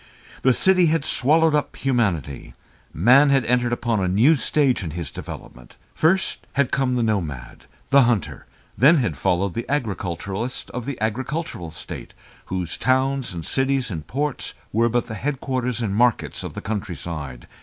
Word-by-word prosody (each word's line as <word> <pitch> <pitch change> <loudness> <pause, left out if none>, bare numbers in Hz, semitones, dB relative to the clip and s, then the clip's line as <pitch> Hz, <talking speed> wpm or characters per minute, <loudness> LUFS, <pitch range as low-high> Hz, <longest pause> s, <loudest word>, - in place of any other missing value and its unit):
The 130 -1 +4
city 185 -2 +4
had 160 -2 +1
swallowed 155 +5 +3
up 150 -1 0
humanity; 100 - -1 0.4
man 130 - +5
had 135 -2 +3
entered 125 0 +1
upon 120 -2 0
a 95 - 0
new 115 - +4
stage 140 -2 +1
in 85 - -4
his 85 0 -5
development. - - -10 0.2
First 190 +5 +1
had 140 -2 +1
come 130 -2 +1
the 120 - +1
nomad, 80 - -3 0.3
the 140 0 +7
hunter, 120 -5 0 0.3
then 150 +7 +6
had 115 - 0
followed 90 +7 0
the 115 - -5
agriculturist 110 - -3
of 125 -2 -5
the 140 -2 -5
agricultural 115 - -3
state, 80 - -8 0.3
whose 90 -3 -4
towns 130 0 +1
and 85 -2 -6
cities 135 -3 0
and 80 -4 -6
ports 145 +1 -3 0.2
were 115 +2 +3
but 120 +1 0
the 115 - -7
headquarters 125 -1 -2
and 100 -3 -1
markets 120 +2 +1
of - - -7
the - - -5
countryside. 85 - -5
120 Hz, 160 wpm, -23 LUFS, 95-135 Hz, 0.4 s, the